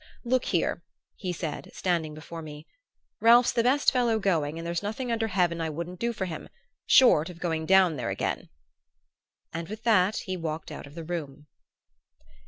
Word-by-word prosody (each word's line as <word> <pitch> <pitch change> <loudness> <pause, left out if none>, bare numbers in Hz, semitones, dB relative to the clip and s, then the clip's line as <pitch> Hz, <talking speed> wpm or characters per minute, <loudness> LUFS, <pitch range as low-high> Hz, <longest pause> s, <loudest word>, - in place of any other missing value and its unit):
"Look 255 +1 +1
here," - - 0 0.3
he 185 -3 -4
said, 165 -3 -5
standing 165 -4 -1
before 165 +2 -8
me, 150 -1 -9 0.5
"Ralph's 235 +2 +6
the 235 - +2
best 260 +5 +3
fellow 240 -3 +2
going 165 -7 0
and 165 - -6
there's 170 0 -2
nothing 220 +5 -3
under 225 -1 0
heaven 175 -4 +1
I 160 - -1
wouldn't 170 +3 -6
do 235 0 0
for 205 -4 -3
him 160 -4 -7 0.4
short 185 - +6
of 175 - -10
going 160 -2 -2
down 185 -5 +5
there - - -3
again." - - -3 1.0
And 165 0 -4
with 215 +1 -7
that 210 -3 +4
he 185 -2 -3
walked 160 -2 -5
out - - -8
of 145 - -15
the 165 - -6
room. 150 -4 -5
175 Hz, 180 wpm, -27 LUFS, 160-220 Hz, 1.0 s, Ralph's